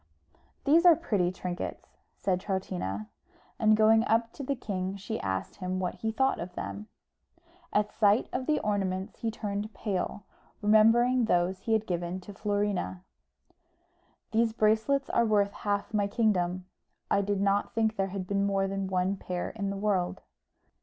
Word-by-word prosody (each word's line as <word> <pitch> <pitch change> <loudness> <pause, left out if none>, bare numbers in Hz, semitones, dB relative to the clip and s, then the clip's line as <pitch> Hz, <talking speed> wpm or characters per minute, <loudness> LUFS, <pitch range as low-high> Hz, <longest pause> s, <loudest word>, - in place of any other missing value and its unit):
"These 315 +4 +5
are 350 -2 +8
pretty 205 - 0
trinkets," 180 -1 -6 0.2
said 185 -2 0
Troutina; 180 - -3 0.5
and 215 0 +5
going 220 +1 +5
up 230 +1 +1
to - - -8
the 275 +1 -1
king 190 -5 -3
she 205 +3 -4
asked 95 -1 -3
him 185 -1 -3
what 180 -1 -1
he 220 - -3
thought 265 +4 +1
of 175 +1 -6
them. 210 +1 -5 0.8
At 210 0 +1
sight 210 +1 +3
of 255 0 -2
the 305 -1 +3
ornaments 195 -1 -2
he 230 - -1
turned 210 -1 -4
pale, 200 -1 -3 0.4
remembering 230 +4 +5
those 180 -2 +1
he 225 - -1
had 220 -1 +2
given 175 0 -3
to 200 +3 -10
Florina. 205 -3 -1 1.3
"These 225 0 +2
bracelets 225 +6 +2
are 235 - +3
worth 205 -3 +2
half 205 +1 -2
my 205 -1 +2
kingdom; 185 -5 0 0.5
I 200 - +4
did 200 0 -1
not 200 +4 +1
think 220 -1 +1
there 195 -2 0
had 195 -1 -5
been 200 +1 0
more 195 -1 +1
than 195 0 -2
one 185 +1 0
pair 180 -1 -4
in 200 -3 -3
the 195 - -3
world." 195 -3 0
205 Hz, 160 wpm, -29 LUFS, 185-220 Hz, 1.3 s, are